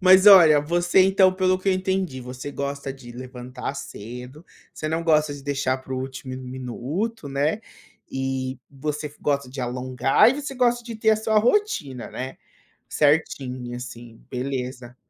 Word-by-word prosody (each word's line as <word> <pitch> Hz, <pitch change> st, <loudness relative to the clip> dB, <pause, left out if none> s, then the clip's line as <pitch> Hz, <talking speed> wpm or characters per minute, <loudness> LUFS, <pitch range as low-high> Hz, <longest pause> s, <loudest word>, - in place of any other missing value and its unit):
Mas 185 Hz, +1 st, +7 dB
olha, 170 Hz, -7 st, +9 dB
você, 175 Hz, +5 st, +2 dB
então, 190 Hz, 0 st, +5 dB
pelo 185 Hz, 0 st, +2 dB
que 190 Hz, +1 st, -2 dB
eu -, -, +5 dB
entendi, 185 Hz, -6 st, -1 dB
você 125 Hz, +3 st, -7 dB
gosta 140 Hz, -1 st, -4 dB
de 125 Hz, -3 st, -12 dB
levantar 125 Hz, +2 st, -7 dB
cedo, 125 Hz, +6 st, -8 dB, 0.3 s
você 155 Hz, -, -4 dB
não 160 Hz, +1 st, -1 dB
gosta 155 Hz, -2 st, +3 dB
de 140 Hz, -, -10 dB
deixar 135 Hz, -2 st, -1 dB
para 130 Hz, 0 st, -9 dB
o -, -, -2 dB
último 130 Hz, 0 st, -6 dB
mi 130 Hz, -, -8 dB
minuto, 145 Hz, -, -4 dB
né, 145 Hz, +9 st, 0 dB, 0.5 s
e 130 Hz, -1 st, -3 dB
você 150 Hz, +1 st, -4 dB
gosta 140 Hz, -2 st, 0 dB
de 135 Hz, +1 st, -6 dB
alongar 125 Hz, -, +3 dB
e -, -, -1 dB
você 280 Hz, -1 st, -5 dB
gosta 240 Hz, -1 st, +2 dB
de 230 Hz, -1 st, -6 dB
ter 220 Hz, 0 st, +3 dB
a 220 Hz, -, +4 dB
sua 220 Hz, 0 st, +2 dB
rotina, 210 Hz, -, 0 dB
né. 130 Hz, +1 st, -6 dB, 0.5 s
Certinha 130 Hz, -5 st, 0 dB
assim, 120 Hz, -2 st, -9 dB
beleza. 125 Hz, -1 st, -4 dB
140 Hz, 165 wpm, -24 LUFS, 130-185 Hz, 0.5 s, olha